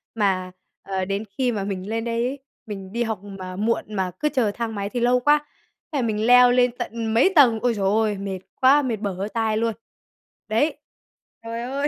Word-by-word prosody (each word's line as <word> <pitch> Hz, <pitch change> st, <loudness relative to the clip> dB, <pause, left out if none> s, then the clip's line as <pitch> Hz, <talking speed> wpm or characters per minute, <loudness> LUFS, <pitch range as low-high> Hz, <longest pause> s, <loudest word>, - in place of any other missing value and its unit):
mà, 190 Hz, -4 st, 0 dB, 0.3 s
ờ, 190 Hz, -1 st, -3 dB
đến 200 Hz, +2 st, -2 dB
khi 255 Hz, -2 st, +1 dB
mà 205 Hz, -4 st, -2 dB
mình 195 Hz, 0 st, -4 dB
lên 225 Hz, 0 st, -2 dB
đấy 235 Hz, 0 st, 0 dB
ấy, 280 Hz, +2 st, -5 dB, 0.3 s
mình 195 Hz, -3 st, -7 dB
đi 235 Hz, +2 st, 0 dB
học 220 Hz, -4 st, -3 dB
mà 190 Hz, -2 st, -8 dB
muộn 220 Hz, +4 st, 0 dB
mà 190 Hz, -2 st, -1 dB
cứ 300 Hz, -, +1 dB
chờ 255 Hz, -8 st, +1 dB
thang 225 Hz, +1 st, -4 dB
máy 200 Hz, 0 st, -3 dB
thì 245 Hz, -, -3 dB
lâu 245 Hz, +1 st, +3 dB
quá, 295 Hz, +3 st, +3 dB, 0.5 s
thế 295 Hz, -, -2 dB
là -, -, +1 dB
mình 215 Hz, 0 st, -1 dB
leo 250 Hz, 0 st, +7 dB
lên 250 Hz, 0 st, +4 dB
tận 230 Hz, -2 st, -3 dB
mấy 320 Hz, +12 st, +4 dB
tầng, 245 Hz, -7 st, +6 dB
ôi 245 Hz, -1 st, +2 dB
giời 200 Hz, -3 st, -2 dB
ôi, 210 Hz, +1 st, +2 dB
mệt 195 Hz, -1 st, -4 dB, 0.2 s
quá, 270 Hz, +3 st, +6 dB
mệt 255 Hz, -5 st, -1 dB
bở 205 Hz, -2 st, -3 dB
hơi 195 Hz, +3 st, -4 dB
tai 220 Hz, -1 st, 0 dB
luôn. 230 Hz, 0 st, 0 dB, 0.7 s
Đấy, 230 Hz, +9 st, +1 dB, 0.7 s
trời 230 Hz, +1 st, -5 dB
ơi. 275 Hz, +3 st, -1 dB
225 Hz, 215 wpm, -23 LUFS, 200-245 Hz, 0.7 s, leo